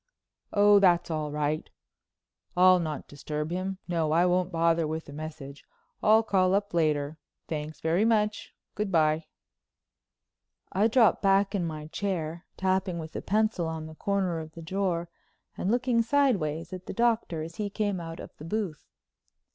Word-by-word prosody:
"Oh, 205 0 +6
that's 175 -3 +3
all 155 -2 -2
right. 150 +1 -1 0.9
I'll 185 0 +7
not 155 -3 -4
disturb 150 +2 -5
him. 185 +2 -2
No, 165 -3 0
I 170 +2 +4
won't 180 0 +1
bother 165 -1 +2
with 160 +1 -4
a - - -9
message. 145 -2 -8 0.4
I'll 220 +1 +5
call 190 -3 +2
up 200 -1 -1
later. 155 -2 0 0.3
Thanks 155 -1 -5
very 165 +5 +2
much. 215 -1 +1 0.2
Good 210 -2 -2
bye." 155 -1 +2 1.4
I 205 +4 +3
dropped 230 -1 +4
back 195 0 +3
in 180 -4 0
my 155 -2 -6
chair, 170 -1 -3
tapping 190 -1 0
with 160 -1 -7
a - - -3
pencil 215 -4 +1
on 160 -1 -4
the 160 - -9
corner 185 -1 -1
of 160 0 -8
the 165 - -9
drawer 175 -1 -1 0.5
and 185 - -2
looking 240 0 +2
sideways 215 - +1
at 185 0 -8
the - - -4
Doctor 230 -9 +1
as 165 +1 -9
he 210 -1 -2
came 205 -2 -1
out 165 -1 -7
of - - -10
the 150 - -9
booth. 185 -4 -3
175 Hz, 165 wpm, -28 LUFS, 160-200 Hz, 1.4 s, I'll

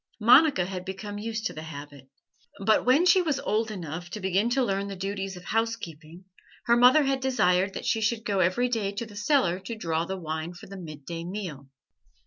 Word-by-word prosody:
Monica 245 - +6
had 185 -1 -5
become 205 +2 -6
used 220 0 -4
to - - -1
the 155 - -7
habit, 145 -3 -10 0.6
but 220 0 +4
when 270 +8 +4
she 365 +1 +6
was 305 -6 0
old 220 +1 0
enough 175 -3 -6
to 210 - -6
begin 190 +3 +1
to 260 +2 +2
learn 195 -3 -1
the 200 - -6
duties 195 0 -4
of 180 - -11
housekeeping 185 -6 -4 0.4
her 235 - +4
mother 250 +5 +6
had 270 -1 0
desired 195 -8 +2
that - - -5
she 225 - +1
should 220 +1 0
go 200 -2 0
every 185 +8 +2
day 220 -5 -1
to 220 +4 -4
the 210 -2 -13
cellar 205 - +2
to 210 +5 -6
draw 165 -5 -1
the 190 +3 -4
wine 160 0 -5
for - - -12
the 195 - -10
midday 165 -1 -7
meal. 170 -7 -6
195 Hz, 205 wpm, -27 LUFS, 175-230 Hz, 0.6 s, Monica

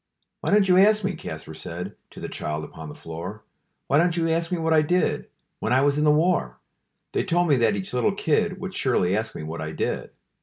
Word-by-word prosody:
"Wy - - -2
don't 205 -1 +4
you 180 0 +6
ask 210 +2 +5
me," 195 0 0
Kaspar 80 - -7
said 80 - -6
To - - -12
the - - -5
child 75 0 -4
upon 80 0 -9
the - - -9
floor, 85 +6 -7 0.4
"Why 140 - +3
don't 175 0 +2
you 165 -1 +1
ask 165 +1 0
me 180 - +1
what 160 0 +1
I 155 - +6
did 175 +4 0 0.3
When - - -2
I 130 - +4
was 145 +1 +2
in 150 - +2
the - - +5
war? 150 - +2 0.5
They - - 0
told 175 +1 +2
me 145 -4 +4
that 115 -3 +3
each 95 +2 -5
little 160 +11 +1
kid 195 +3 +1
Would 190 -1 -5
surely 110 - +1
ask 110 +1 -2
me - - -5
what 80 +1 -5
I 80 0 -4
did. - - -2
150 Hz, 235 wpm, -25 LUFS, -, 0.5 s, you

